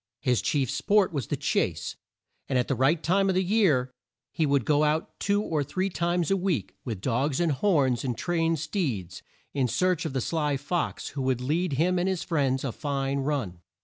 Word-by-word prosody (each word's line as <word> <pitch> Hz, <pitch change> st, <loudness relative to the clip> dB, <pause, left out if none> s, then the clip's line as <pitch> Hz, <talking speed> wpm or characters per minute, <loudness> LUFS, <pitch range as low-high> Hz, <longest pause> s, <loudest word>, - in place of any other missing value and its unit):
His 125 Hz, -6 st, +2 dB
chief 135 Hz, -5 st, 0 dB
sport 205 Hz, -4 st, +2 dB
was 140 Hz, -6 st, -2 dB
the -, -, -2 dB
chase, -, -, -1 dB, 0.5 s
and, 130 Hz, -, +1 dB
at 125 Hz, -, +1 dB
the -, -, +1 dB
right 135 Hz, +6 st, +2 dB
time 195 Hz, +3 st, +2 dB
of 190 Hz, -, +1 dB
the 185 Hz, -, +2 dB
year, 175 Hz, -, +2 dB, 0.4 s
he 160 Hz, -, 0 dB
would 140 Hz, -4 st, +2 dB
go 150 Hz, 0 st, +3 dB
out 155 Hz, +2 st, -1 dB
two 205 Hz, +1 st, +1 dB
or 155 Hz, -6 st, 0 dB
three 190 Hz, +7 st, -2 dB
times 175 Hz, 0 st, 0 dB
a -, -, +5 dB
week, 180 Hz, -, -1 dB
with 110 Hz, -6 st, -5 dB
dogs 130 Hz, +5 st, 0 dB
and 170 Hz, -2 st, +2 dB
horns 140 Hz, -, +2 dB
and 125 Hz, -4 st, -2 dB
trained 165 Hz, -2 st, 0 dB
steeds, 140 Hz, -, -3 dB, 0.3 s
in 135 Hz, -3 st, +1 dB
search 170 Hz, +7 st, +1 dB
of 155 Hz, -, -3 dB
the 135 Hz, -, 0 dB
sly 150 Hz, 0 st, 0 dB
fox 145 Hz, +6 st, -2 dB
who 140 Hz, -, -5 dB
would 130 Hz, -2 st, +1 dB
lead 155 Hz, +6 st, 0 dB
him 175 Hz, +6 st, +2 dB
and 180 Hz, +2 st, +1 dB
his 185 Hz, -3 st, -1 dB
friends 135 Hz, -5 st, 0 dB
a 135 Hz, -, -1 dB
fine 140 Hz, 0 st, -2 dB
run. 135 Hz, -, -2 dB
150 Hz, 205 wpm, -27 LUFS, 130-175 Hz, 0.5 s, a